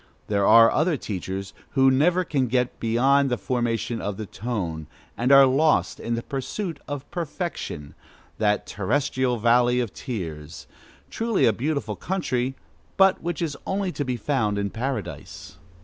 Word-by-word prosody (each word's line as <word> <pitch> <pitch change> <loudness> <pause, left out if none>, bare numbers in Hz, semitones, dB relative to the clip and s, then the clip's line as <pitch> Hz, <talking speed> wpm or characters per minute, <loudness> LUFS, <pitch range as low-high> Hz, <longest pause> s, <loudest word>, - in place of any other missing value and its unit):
There 100 -1 +2
are 115 +1 +8
other 155 0 +1
teachers 95 -2 -5 0.2
who 135 -1 +5
never 175 +7 +3
can 140 -6 0
get 125 +1 0
beyond 135 +5 +3
the 125 - 0
formation 120 -2 -2
of 100 -1 -3
the 110 - -5
tone, 95 -9 -4 0.3
and 125 +3 0
are 135 0 +9
lost 145 +4 +2
in 115 - -2
the 115 - -4
pursuit 155 +4 -4
of 145 -1 -5
perfection, 165 - -5 0.5
that 105 -1 +1
"terrestrial 130 +3 0
valley 120 +2 +3
of 120 -5 -2
tears." 80 - -6 0.5
Truly 225 -2 +1
a 115 - +4
beautiful 120 -3 -2
country, 135 - -2 0.4
but 195 -1 +4
which 170 0 -3
is 150 -3 -2
only 195 -1 -1
to 145 - -3
be 125 -2 -2
found 110 -4 0
in 100 -1 -2
Paradise! 115 -7 -5
125 Hz, 150 wpm, -24 LUFS, 105-145 Hz, 0.5 s, are